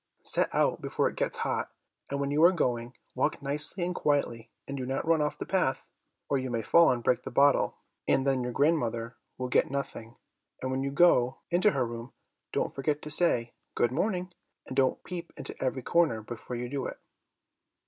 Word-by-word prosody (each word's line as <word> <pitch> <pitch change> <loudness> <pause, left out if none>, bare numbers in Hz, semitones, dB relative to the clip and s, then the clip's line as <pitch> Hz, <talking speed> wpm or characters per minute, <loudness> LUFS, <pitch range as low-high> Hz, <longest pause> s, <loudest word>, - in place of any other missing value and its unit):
Set - - +1
out - - +1
before - - 0
it - - -5
gets - - -1
hot, - - -1 0.4
and 140 - -2
when 140 0 -1
you 150 +2 +3
are 175 - +8
going, 120 -8 -1 0.2
walk - - 0
nicely 150 +6 0
and 180 - -2
quietly 130 -8 0 0.2
and 140 - -4
do 130 - -4
not 135 +4 -2
run 165 -1 +3
off 150 0 -1
the - - -5
path, 160 -9 -1 0.4
or 140 - +1
you 130 0 -3
may 115 -2 -2
fall 170 +8 +6
and 120 -2 0
break 125 - +2
the - - -6
bottle, 140 0 +3 0.3
and 135 - +2
then 135 -2 +2
your 125 0 -2
grandmother 120 -5 0 0.2
will 130 - -3
get 125 - +2
nothing; 130 -4 -5 0.4
and 130 - -3
when 130 0 -1
you 140 - -1
go 135 -5 +4
into 180 +5 +4
her 135 -10 0
room, 115 +1 -7 0.4
don't - - -1
forget 145 +2 -1
to 150 - -4
say, 125 -8 +4 0.2
'Good 120 - +2
morning,' 180 +4 -1 0.3
and 130 - -7
don't 130 -1 +2
peep 175 -2 -6
into - - -6
every 130 -1 -1
corner 150 -11 +2
before 120 +2 -7
you 120 +1 -3
do 135 +1 -3
it." - - -7
135 Hz, 200 wpm, -29 LUFS, 125-155 Hz, 0.4 s, are